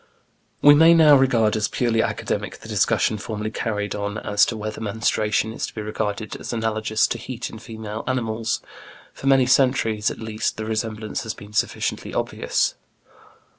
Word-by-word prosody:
We 145 - +9
may 165 +3 +7
now 155 -3 +7
regard 120 -5 +3
as 105 -1 +1
purely 115 -2 +1
academic - - -3
the - - -13
discussion 110 - +1
formerly 110 0 -4
carried 105 -3 -2
on 105 +1 -3
as 105 -1 +2
to 115 - -3
whether 110 +1 -5
menstruation 110 0 0
is - - -3
to - - -12
be 110 - -4
regarded 105 0 -3
as - - -7
analogous 110 -1 0
to 120 - -3
heat 125 +1 -6
in 110 - -9
female 110 -1 -7
animals. 115 -3 -1 0.5
For 135 - -6
many 135 -2 +5
centuries 125 -5 +2
at - - -6
least 110 -1 -3
the 110 - -4
resemblance 110 0 -3
has 110 -1 -5
been 105 0 -13
sufficiently 110 - -2
obvious. - - 0
110 Hz, 170 wpm, -23 LUFS, 105-120 Hz, 0.5 s, We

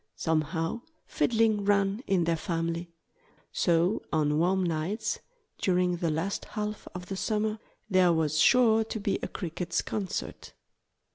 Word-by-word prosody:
Somehow 160 +5 -1 0.2
fiddling 220 -3 +2
ran 200 +1 +2
in 190 -3 +2
their 165 0 +1
family. 170 +1 -2 0.6
So 175 +3 +2
on 150 -1 +2
warm 185 +3 +2
nights, 180 +6 -1 0.4
during 180 -1 +2
the 170 -1 0
last 165 +6 -2
half 210 -1 -5
of 180 0 -6
the 195 - -5
summer, 215 +2 -1 0.3
there 185 -3 +4
was 155 -2 +1
sure 225 -1 +5
to 220 0 -5
be 200 -1 -1
a - - -2
Crickets' 175 0 -3
concert. 200 -4 -4
180 Hz, 135 wpm, -28 LUFS, 165-210 Hz, 0.6 s, sure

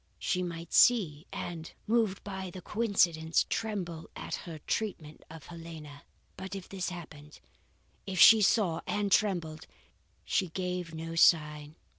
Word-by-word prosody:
She 180 - -1
might 170 -2 -6
see, 180 -10 +4
and, 165 -2 -6
moved 220 -4 +1
by 190 -2 -5
the 180 0 -10
coincidence, 175 -8 +1
tremble 180 -7 -3
at - - -7
her 165 -3 -5
treatment 165 -8 -3
of 160 -1 -11
Helena. 160 -4 -10 0.3
"But 190 +1 -6
if 190 -2 -7
this 190 -2 -4
happened 155 -4 -10 0.7
if 190 -2 -3
she 220 -1 +9
saw 190 -5 +2
and 205 -1 -1
trembled 170 -7 0 0.6
she 190 - +1
gave 180 -1 -4
no 165 +1 -6
sign. 150 -2 +3
175 Hz, 135 wpm, -30 LUFS, 160-195 Hz, 0.7 s, she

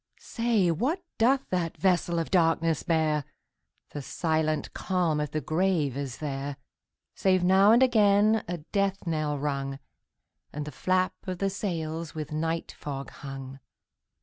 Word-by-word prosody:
Say, 230 -7 +1
what 280 - -1 0.2
doth 260 +4 +3
that 175 -3 -1
vessel 175 -2 +2
of 165 - -2
darkness 165 -3 +2
bear? 155 -3 +1 0.7
The 145 - -5
silent 155 +1 -1
calm 175 -5 0
of 150 -1 -1
the 155 +2 -2
grave 160 -5 +1
is 135 -3 -4
there, 140 -1 -4 0.6
Save 185 -2 +2
now 190 +3 +6
and 240 +3 +6
again 215 -2 +4
a 175 +1 -3
death 195 +5 -1
knell 155 -3 -1
rung, 140 -1 -2 0.7
And 150 0 -5
the 150 - -6
flap 185 +6 +1
of 185 -1 -3
the 195 +1 0
sails 165 -6 -4
with 155 -2 -5
night 160 +2 -2
fog 140 -2 -6
hung. 135 -1 -8
165 Hz, 145 wpm, -28 LUFS, 150-190 Hz, 0.7 s, now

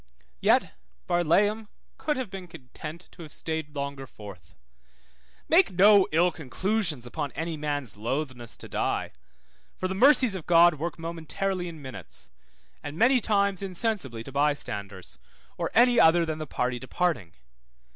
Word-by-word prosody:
Yet - - +3 0.3
Barlaam 200 +6 +2 0.3
could 300 -3 -1
have 250 -7 -4
been 190 -2 -7
content 155 +3 -10
to - - -14
have 155 -3 -10
stayed 160 -2 -4
longer 140 -1 -4
forth. 100 -6 -13 0.9
Make 335 - +4
no 200 +1 +6
ill 175 +3 +3
conclusions 160 - -1
upon 145 +3 -4
any 165 0 -3
man's 145 -7 -3
lothness 120 +1 -4
to - - -8
die, - - -2 0.7
for 185 - -2
the 190 - -3
mercies 255 +1 +5
of 185 -5 -7
God 170 -3 +6
work 170 +3 -3
momentarily 170 +3 -3
in 160 -4 -9
minutes, 115 - -10 0.5
and 145 +1 -7
many 250 +5 +4
times 200 -3 +1
insensibly 185 - -3
to 135 - -10
bystanders, 105 -10 -2 0.4
or - - -2
any 245 +1 +5
other 165 +1 +5
than 155 -1 -4
the 155 - -5
party 125 -2 -2
departing. 130 - -2
165 Hz, 145 wpm, -27 LUFS, 140-195 Hz, 0.9 s, no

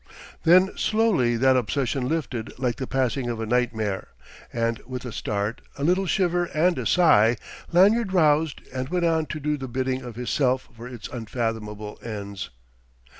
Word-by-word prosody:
Then 185 +3 +6
slowly 200 - +2
that 130 +2 +4
obsession 125 +2 0
lifted 130 -7 -3
like 125 -2 -1
the 130 - -4
passing 130 -1 0
of 115 -2 -3
a 110 - -2
nightmare; 110 -4 -1 0.4
and 115 -1 -1
with 130 -1 -6
a 125 - -5
start, 105 +1 -3 0.2
a 140 - -4
little 185 +4 +2
shiver 175 -2 +1
and 175 +3 +3
a - - -1
sigh, 120 -10 +5 0.4
Lanyard 200 +4 +4
roused 155 -4 +2
and 130 0 -3
went 175 0 0
on 160 -2 +1
to 155 - -5
do 150 0 -1
the 135 -1 -6
bidding 130 +1 -2
of 120 -3 -8
his 125 +1 -4
Self 130 -2 +1
for 115 +2 -9
its 120 -4 -8
unfathomable 110 -3 -4
ends.... 100 -3 -6
130 Hz, 170 wpm, -25 LUFS, 115-160 Hz, 0.4 s, Then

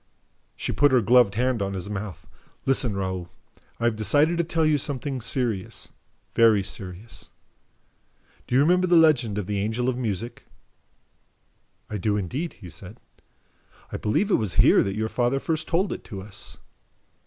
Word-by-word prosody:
She - - -3
put 145 -1 +4
her 130 - +5
gloved 120 -2 +4
hand 125 -1 +1
on 100 0 -2
his 95 0 -4
mouth. 100 -4 -6 0.4
"Listen, 125 -6 +1
Raoul. 95 -2 -3 0.5
I - - -5
have 120 -2 +2
decided 145 - +3
to - - +3
tell 165 -1 0
you 150 -1 +3
something 135 -1 -3
serious, 115 -5 -2 0.4
very 110 -3 +5
serious... 95 +3 -7 1.2
Do 125 - -1
you 135 - +6
remember 180 +4 +3
the 175 - +4
legend 135 -10 +4
of 105 - -2
the 100 +1 -2
Angel 110 +5 -1
of 130 -1 0
Music?" 115 0 -4 1.4
"I 105 - -4
do 105 +2 0
indeed," 130 - -3
he 95 - -12
said. 95 +8 -10 0.9
"I - - -3
believe 195 - 0
it - - +3
was 105 -5 -3
here - - +6
that 100 0 -1
your 110 0 0
father 120 +4 0
first 160 +2 -2
told 185 +4 +1
it - - -8
to 95 -4 -7
us." 100 0 -7
115 Hz, 165 wpm, -25 LUFS, 100-135 Hz, 1.4 s, you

